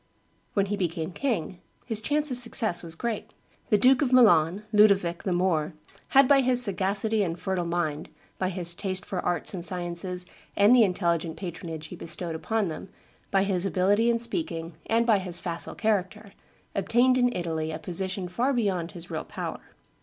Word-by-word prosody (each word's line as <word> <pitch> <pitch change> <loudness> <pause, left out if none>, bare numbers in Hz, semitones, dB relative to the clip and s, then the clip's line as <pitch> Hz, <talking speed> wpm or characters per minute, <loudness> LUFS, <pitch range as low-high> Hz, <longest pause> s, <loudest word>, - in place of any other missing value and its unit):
When 200 -2 +3
he 205 +1 -2
became 170 -3 -2
king, 190 - -2 0.3
his 220 -3 -1
chance 295 +4 0
of 250 - -1
success 225 -6 0
was 165 -1 -7
great. 230 +5 -4 0.4
The 210 - +5
Duke 255 +5 +5
of 265 -4 +1
Milan, 200 -6 +5
Ludovic, 200 -5 +4
the 190 - -2
Moor, 175 -3 +1 0.3
had 270 -1 +5
by 275 0 +5
his 255 -1 +2
sagacity 200 +1 +1
and 170 -3 -2
fertile 185 -2 -2
mind, 165 -3 -2 0.3
by 185 - 0
his 175 -2 0
taste 185 +1 -4
for 185 - -3
arts 175 +1 -1
and 180 -3 -4
sciences 180 0 -3 0.3
and 205 +4 +6
the 245 - +6
intelligent 170 -5 0
patronage 165 -3 -6
he - - -7
bestowed 170 0 -5
upon 215 +5 -1
them, 165 +3 -7 0.4
by 195 -1 +2
his 190 -3 0
ability 200 +4 +2
in 235 - +3
speaking, 180 - -3
and 230 +1 +2
by 220 -4 +4
his 180 -2 -2
facile 170 -2 -2
character, 210 -1 -1 0.4
obtained 245 +6 +3
in 245 0 +3
Italy 160 -3 -2
a 155 - -4
position 185 +3 -1
far 240 +10 0
beyond 190 -8 -1
his 175 -1 -10
real 160 - -3
power. - - -6
190 Hz, 175 wpm, -27 LUFS, 170-220 Hz, 0.4 s, and